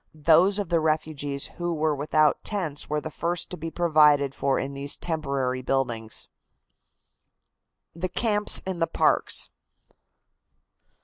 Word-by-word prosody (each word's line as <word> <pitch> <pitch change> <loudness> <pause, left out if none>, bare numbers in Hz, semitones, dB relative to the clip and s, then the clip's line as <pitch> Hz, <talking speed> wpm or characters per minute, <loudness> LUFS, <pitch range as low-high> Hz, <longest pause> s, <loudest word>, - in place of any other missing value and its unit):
Those 165 +6 +4
of 200 -5 -3
the 170 -1 +2
refugees 155 -3 -1
who 175 -1 -1
were 155 0 +1
without 150 +1 +1
tents 175 -9 -2
were 150 0 0
the 155 - -6
first 170 +2 -2
to - - -4
be 165 +2 -5
provided 150 -5 +3
for 140 -1 0
in 140 +1 -3
these 140 +1 -3
temporary 140 -6 -2
buildings. 120 -4 -2 1.7
THE 180 +2 -3
CAMPS 210 +1 +1
IN 185 -2 -4
THE 165 - +1
PARKS. - - +2
155 Hz, 130 wpm, -25 LUFS, 140-170 Hz, 1.7 s, Those